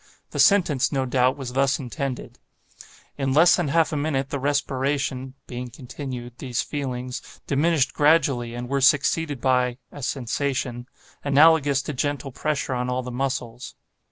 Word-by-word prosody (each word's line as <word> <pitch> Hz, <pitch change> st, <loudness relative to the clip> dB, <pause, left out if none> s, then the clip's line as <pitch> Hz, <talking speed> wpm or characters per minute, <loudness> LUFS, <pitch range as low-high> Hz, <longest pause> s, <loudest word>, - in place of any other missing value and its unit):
The -, -, -5 dB
sentence, 165 Hz, -10 st, +4 dB
no 135 Hz, -2 st, 0 dB
doubt, 130 Hz, +1 st, +2 dB
was 130 Hz, -3 st, -6 dB
thus 135 Hz, +1 st, +2 dB
intended: 135 Hz, -1 st, -5 dB, 0.8 s
'In 135 Hz, -1 st, 0 dB
less 165 Hz, +5 st, +6 dB
than 175 Hz, -4 st, -1 dB
half 165 Hz, +2 st, +2 dB
a -, -, 0 dB
minute, 145 Hz, -2 st, -1 dB
the 140 Hz, -, -2 dB
respiration 135 Hz, -1 st, -1 dB
[being 125 Hz, 0 st, -6 dB
continued, 125 Hz, -1 st, -8 dB
these 130 Hz, 0 st, -2 dB
feelings] 125 Hz, -3 st, -4 dB, 0.2 s
diminished 145 Hz, -1 st, +1 dB
gradually, 140 Hz, -6 st, +2 dB
and 120 Hz, 0 st, -5 dB
were 140 Hz, +1 st, 0 dB
succeeded 145 Hz, +1 st, +2 dB
by 125 Hz, -1 st, +1 dB
[a 145 Hz, -, -10 dB
sensation] 125 Hz, -1 st, -2 dB, 0.4 s
analogous 145 Hz, -1 st, +4 dB
to 150 Hz, -, -4 dB
gentle 140 Hz, 0 st, -2 dB
pressure 145 Hz, 0 st, -2 dB
on 125 Hz, 0 st, -2 dB
all 125 Hz, 0 st, -1 dB
the 125 Hz, -, -6 dB
muscles. 125 Hz, -2 st, -4 dB
135 Hz, 150 wpm, -24 LUFS, 125-145 Hz, 0.8 s, less